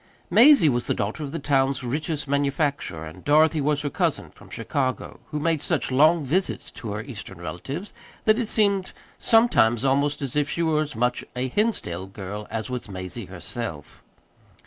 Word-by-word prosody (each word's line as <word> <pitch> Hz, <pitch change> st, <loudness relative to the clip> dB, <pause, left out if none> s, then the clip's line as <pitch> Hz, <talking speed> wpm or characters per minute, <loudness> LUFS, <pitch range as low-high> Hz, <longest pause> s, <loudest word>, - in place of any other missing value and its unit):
Mazie 270 Hz, -, +7 dB
was 120 Hz, -3 st, +1 dB
the -, -, +1 dB
daughter 105 Hz, +9 st, -3 dB
of 145 Hz, -2 st, -4 dB
the 165 Hz, -, -3 dB
town's 135 Hz, -3 st, +1 dB
richest 145 Hz, +4 st, -2 dB
manufacturer, 140 Hz, -, -1 dB
and 80 Hz, -, -11 dB
Dorothy 155 Hz, +1 st, +4 dB
was 150 Hz, +1 st, 0 dB
her 145 Hz, -, -1 dB
cousin -, -, -1 dB
from -, -, -17 dB
Chicago, 130 Hz, -3 st, -3 dB
who 150 Hz, -, -3 dB
made 160 Hz, -1 st, 0 dB
such -, -, -1 dB
long 155 Hz, +5 st, +5 dB
visits 180 Hz, +8 st, -1 dB
to 110 Hz, -4 st, -6 dB
her 105 Hz, +1 st, -4 dB
Eastern 110 Hz, -8 st, -8 dB
relatives 135 Hz, -, -6 dB, 0.3 s
that 215 Hz, +2 st, +4 dB
it 235 Hz, -, -1 dB
seemed 200 Hz, -4 st, +1 dB, 0.3 s
sometimes 140 Hz, -, +4 dB
almost 140 Hz, +2 st, +1 dB
as 135 Hz, -1 st, -4 dB
if 145 Hz, -1 st, +1 dB
she 170 Hz, -, -1 dB
were 155 Hz, -2 st, +2 dB
as 150 Hz, -4 st, -4 dB
much 125 Hz, +2 st, 0 dB
of -, -, -14 dB
a 130 Hz, +1 st, -1 dB
Hinsdale 125 Hz, -, -1 dB
girl 100 Hz, +1 st, -7 dB
as 110 Hz, -1 st, -3 dB
was 125 Hz, -3 st, -5 dB
Mazie 95 Hz, +3 st, -5 dB
herself. 95 Hz, -, -5 dB
140 Hz, 180 wpm, -24 LUFS, 115-155 Hz, 0.3 s, Mazie